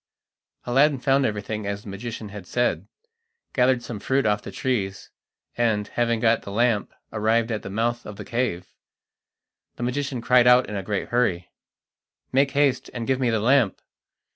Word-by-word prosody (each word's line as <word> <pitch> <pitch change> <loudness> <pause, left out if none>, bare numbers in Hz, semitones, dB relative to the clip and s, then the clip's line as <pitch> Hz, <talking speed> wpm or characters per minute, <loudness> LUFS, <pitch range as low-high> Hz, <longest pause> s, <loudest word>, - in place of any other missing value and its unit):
Aladdin 135 +4 +3
found 135 +1 +2
everything 105 0 -4
as 100 +1 -4
the - - -9
magician 110 +2 -6
had 100 -3 -9
said, 120 +4 0 0.7
gathered 125 -1 +2
some 110 -4 -6
fruit 135 +4 0
off 105 -1 +2
the - - -8
trees, 100 -3 -2 0.4
and, 110 -3 0
having 120 -1 0
got 115 0 +3
the 100 - -8
lamp, 115 0 +1 0.2
arrived 110 +2 +1
at 110 - -2
the - - -7
mouth 115 +4 -1
of 105 - -7
the 105 0 -8
cave. 115 -7 -2 1.0
The - - -6
magician 135 +1 -2
cried 125 +1 +4
out 125 +1 +6
in 105 - -5
a 100 - -2
great 100 +1 -3
hurry: 95 -8 0 0.8
"Make 135 +2 +3
haste 140 -3 +1
and 120 -1 -3
give 130 +1 0
me 125 -2 +1
the 110 -1 +1
lamp." 120 -1 +3
115 Hz, 170 wpm, -24 LUFS, 105-125 Hz, 1.0 s, out